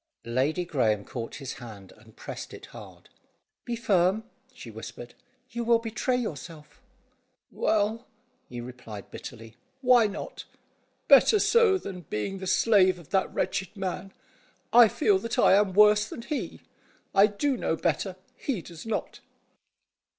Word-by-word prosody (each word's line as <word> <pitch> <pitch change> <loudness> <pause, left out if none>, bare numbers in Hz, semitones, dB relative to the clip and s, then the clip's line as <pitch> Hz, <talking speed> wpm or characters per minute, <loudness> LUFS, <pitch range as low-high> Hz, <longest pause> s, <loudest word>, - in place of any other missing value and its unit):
Lady 135 +9 0
Graeme 110 - 0
caught 115 -2 -6
his 135 -3 -6
hand, 105 -5 -11
and 110 0 -20
pressed - - -8
it - - -11
hard. - - -12 0.6
"Be 240 - -2
firm," 200 -2 +2 0.3
she 120 - -11
whispered; 115 +2 -9 0.4
"you 235 0 -3
will 235 0 +4
betray 230 +3 -2
yourself." 165 - -6 0.7
"Well," 220 +3 0 0.4
he 120 - -7
replied 120 -4 -10
bitterly, 115 -1 -10 0.2
"why 250 -4 +5
not? 205 0 -7 0.6
Better 430 - +7
so 440 -1 +4
than 190 - -7
being 190 - -3
the 190 - -6
slave 190 -2 +4
of 170 -4 -15
that 190 -1 +1
wretched 195 +2 -2
man. 190 0 -4 0.6
I 240 -1 +9
feel 200 -2 +2
that 230 +3 -4
I - - +5
am 200 0 +4
worse 210 +1 +5
than 230 - -8
he. 300 +2 -4 0.5
I 200 +2 +6
do 260 +7 -1
know 165 - -1
better, 175 +3 -1 0.2
he 235 - -3
does 170 +4 -11
not." 220 - -3
190 Hz, 145 wpm, -27 LUFS, 135-225 Hz, 0.7 s, I